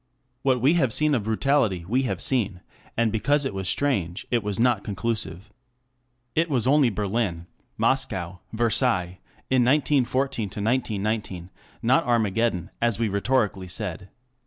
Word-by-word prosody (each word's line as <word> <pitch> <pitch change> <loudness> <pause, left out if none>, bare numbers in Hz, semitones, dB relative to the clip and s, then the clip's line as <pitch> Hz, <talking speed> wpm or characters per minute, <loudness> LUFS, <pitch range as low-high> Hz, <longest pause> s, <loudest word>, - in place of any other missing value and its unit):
What 130 -2 +1
we 140 +6 +4
have 140 -9 +2
seen 150 +5 +2
of 115 -7 0
brutality, 110 -6 +1
we 125 +6 +1
have - - -3
seen, 105 -8 +1 0.4
and 115 -1 +2
because 140 +7 +1
it 135 - -2
was 95 -1 -2
strange, 100 -11 -1
it 120 -1 +2
was 105 -1 -3
not 120 -4 +2
conclusive. 105 -2 -4 0.8
It 165 +1 +2
was 125 -6 +1
only 140 -1 +4
Berlin, 100 -4 -2 0.3
Moscow, 95 -9 -1
Versailles 110 -5 +1 0.3
in 130 -2 +4
1914 135 -3 +1
to 105 - -8
1919, 105 -5 -2 0.3
not 130 +8 +4
Armageddon, 110 -5 0
as 115 -3 +2
we 115 -2 0
rhetorically 100 -2 0
said. 95 -1 -4
115 Hz, 140 wpm, -25 LUFS, 95-130 Hz, 0.8 s, we